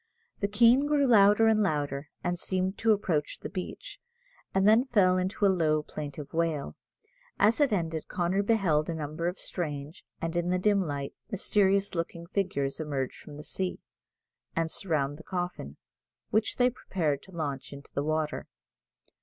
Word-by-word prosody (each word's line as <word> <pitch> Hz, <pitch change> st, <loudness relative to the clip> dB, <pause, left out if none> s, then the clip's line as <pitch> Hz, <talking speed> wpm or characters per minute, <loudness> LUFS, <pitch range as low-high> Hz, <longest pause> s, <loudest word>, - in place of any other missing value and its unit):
The 200 Hz, -, +1 dB
Keen 235 Hz, +7 st, +5 dB
grew 290 Hz, -1 st, +3 dB
louder 210 Hz, -2 st, +6 dB
and 220 Hz, -1 st, +4 dB
louder, 145 Hz, -5 st, -1 dB
and 175 Hz, -1 st, -1 dB
seemed 185 Hz, +1 st, -1 dB
to 225 Hz, -, +3 dB
approach 175 Hz, -8 st, 0 dB
the -, -, -6 dB
beach, 190 Hz, -, -6 dB, 0.5 s
and 195 Hz, +1 st, +3 dB
then 225 Hz, +4 st, +6 dB
fell 200 Hz, -8 st, +4 dB
into 190 Hz, +3 st, 0 dB
a -, -, +7 dB
low, 155 Hz, -5 st, +2 dB
plaintive 145 Hz, -1 st, -7 dB
wail. 160 Hz, -3 st, -1 dB, 0.6 s
As 220 Hz, +6 st, +4 dB
it 285 Hz, -4 st, +4 dB
ended 165 Hz, -5 st, -1 dB
Connor 180 Hz, +3 st, 0 dB
beheld 190 Hz, -9 st, +2 dB
a 165 Hz, -, -2 dB
number 155 Hz, +2 st, -3 dB
of 180 Hz, +2 st, -2 dB
strange 150 Hz, -3 st, -4 dB, 0.2 s
and, 165 Hz, +1 st, -3 dB
in 175 Hz, 0 st, 0 dB
the 180 Hz, -, +2 dB
dim 200 Hz, +1 st, +3 dB
light, 145 Hz, -5 st, -3 dB, 0.2 s
mysterious 200 Hz, 0 st, +2 dB
looking 170 Hz, 0 st, -4 dB
figures 170 Hz, -8 st, -1 dB
emerge 140 Hz, -4 st, -2 dB
from 145 Hz, -1 st, -11 dB
the 150 Hz, -, -8 dB
sea, 185 Hz, +3 st, -3 dB, 0.8 s
and 165 Hz, -1 st, 0 dB
surround 145 Hz, -6 st, -1 dB
the 160 Hz, -, -12 dB
coffin, 180 Hz, 0 st, -4 dB, 0.5 s
which 220 Hz, +1 st, +1 dB
they 250 Hz, 0 st, +3 dB
prepared 155 Hz, -, -2 dB
to 190 Hz, -, -16 dB
launch 140 Hz, -6 st, -4 dB
into 140 Hz, 0 st, -11 dB
the 140 Hz, -, -1 dB
water. 155 Hz, 0 st, -1 dB
175 Hz, 165 wpm, -29 LUFS, 150-200 Hz, 0.8 s, a